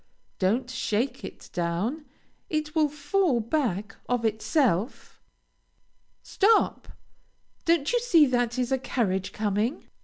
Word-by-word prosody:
Don't 225 +7 +1
shake 250 +1 -2
it - - -10
down; 180 - -2 0.4
it 305 -1 -2
will 310 -2 +3
fall 300 0 +1
back 220 - -2
of 245 -2 0
itself. 220 - 0 1.0
Stop! 430 +3 +2 0.8
don't 330 - +2
you 485 - +3
see 355 -11 +5
there 245 -3 +1
is 250 0 -1
a 265 - +2
carriage 195 -7 -1
coming? 215 +5 -1
250 Hz, 115 wpm, -26 LUFS, 215-305 Hz, 1.0 s, see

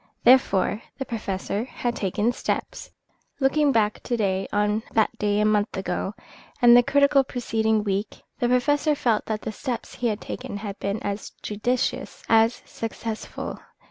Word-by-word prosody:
Therefore, 230 -4 +4 0.2
the 270 - -3
Professor 205 -2 -3
had 240 -1 -3
taken 205 +4 0
steps. 245 - -3 0.5
Looking 285 +1 +3
back 215 -4 +1
to 240 - -2
day 195 -3 0
on 210 +1 +1
that 220 -1 +2
day 205 0 +1
a 210 - +3
month 210 -1 +1
ago, 190 +1 -3 0.4
and 240 -2 +8
the 245 - +9
critical 280 +2 +4
preceding 220 -4 0
week, 200 0 -3 0.2
the 240 - +1
Professor 290 +4 +2
felt 230 -6 +1
that 215 -1 -3
the - - -3
steps 235 +3 -5
he 245 - -1
had 215 -2 -1
taken 205 - -6
had 205 -1 -6
been 200 +2 -2
as 200 +1 -4
judicious 240 +5 -2
as 225 +1 +3
successful. 225 0 -5
220 Hz, 155 wpm, -25 LUFS, 205-245 Hz, 0.5 s, the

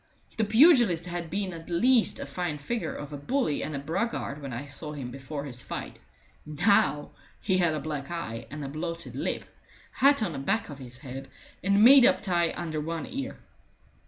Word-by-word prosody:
The 220 - +1
pugilist 225 - +5
had 175 -2 -4
been 190 +1 -2
at 165 0 -10
least 235 +7 +3
a - - -4
fine 175 -4 -3
figure 225 +11 -3
of 145 0 -7
a - - -4
bully 245 - 0
and 155 - -3
a - - -2
braggart 160 0 -2
when 140 -2 -6
I 125 +4 -5
saw 150 +2 -7
him 130 -4 -6
before 140 +2 -6
his 125 -3 -3
fight; - - -6 0.4
now 150 -1 +2 0.3
he 190 -2 +1
had 170 -3 +2
a - - -2
black 150 -3 -5
eye 120 -10 -5
and 150 -1 -6
a - - -4
bloated 165 +4 -5
lip, - - -2 0.5
hat 280 -3 +4
on 200 - -1
the - - -4
back 195 +10 -1
of 145 -2 -8
his 125 -2 -10
head, 135 -1 -8 0.3
and 200 +2 +4
made 265 +2 +9
up - - +4
tie 175 -4 +2
under 160 -3 -3
one 165 +1 -3
ear. 270 0 -5
165 Hz, 195 wpm, -28 LUFS, 145-200 Hz, 0.5 s, made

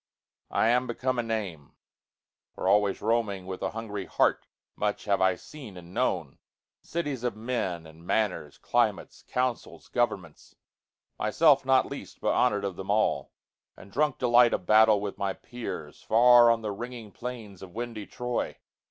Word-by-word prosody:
I 110 - +2
am 125 +2 +2
become 130 +1 -1
a - - +3
name; 105 -10 -4 0.8
For - - -3
always 100 0 +3
roaming 105 -4 0
with 95 0 -6
a - - 0
hungry 105 -3 -5
heartMuch 105 0 -1
have 100 -2 +1
I 95 -1 +4
seen 120 -2 -11
and 90 0 -12
known: 85 - -1 0.4
cities 145 -7 -3
of 120 -4 -1
menAnd 90 -9 -3
manners, 90 -7 -1
climates, - - 0
councils, 125 -1 -2
governments, 100 -10 -2 0.6
Myself 140 +6 +4
not 130 0 +5
least, - - -9
but - - +1
honor'd 105 -5 +2
of 95 -3 -4
them 95 - -7
all; 110 +1 +1 0.5
And 100 - -14
drunk 150 +3 +1
delight 120 -1 +5
of 90 - -6
battle 110 0 +6
with 100 -1 -5
my 100 -1 0
peers, 115 -12 -7
Far 120 +1 +6
on 115 -1 +2
the 105 - -2
ringing 115 0 -7
plains 115 -6 -7
of 95 0 -11
windy 115 -3 -5
Troy. 125 -1 -3
110 Hz, 150 wpm, -28 LUFS, 95-120 Hz, 0.8 s, battle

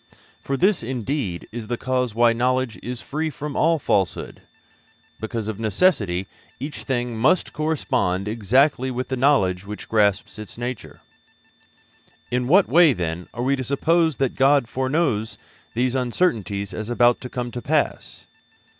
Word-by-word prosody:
For 135 - -2
this, 190 +3 +3
indeed, 120 - -3
is 115 -1 -6
the 120 +1 -2
cause 125 -3 -1
why 120 0 +4
knowledge 125 0 0
is 125 0 -6
free 155 +2 -2
from 150 0 -6 0.3
falsehood, 100 -8 -1 0.8
because 110 0 -4
of 110 -1 -4
necessity 105 - +1 0.3
each 145 +4 -6
thing 120 -3 -2
must 135 +11 +2
correspond 125 - -1
exactly 125 +5 +2
with 125 0 -4
the 130 - -1
knowledge 110 -10 +2
which 105 0 -7
grasps 105 -1 +1
its 110 0 -9
nature. 120 -1 -6 1.3
In 125 0 0
what 185 +7 +5
way, 165 -3 +6
then, 85 -2 -4
are 120 - -4
we 135 +2 +2
to 130 - -4
suppose 160 +4 +1
that 135 -2 0
God 135 -2 +3
foreknows 130 -4 -1 0.4
these 125 +1 +1
uncertainties 115 - -1
as 110 +1 -5
about 120 0 +3
to 125 - -7
come 125 -1 -4
to 120 - -5
pass? 150 +2 -1
125 Hz, 145 wpm, -23 LUFS, 110-140 Hz, 1.3 s, way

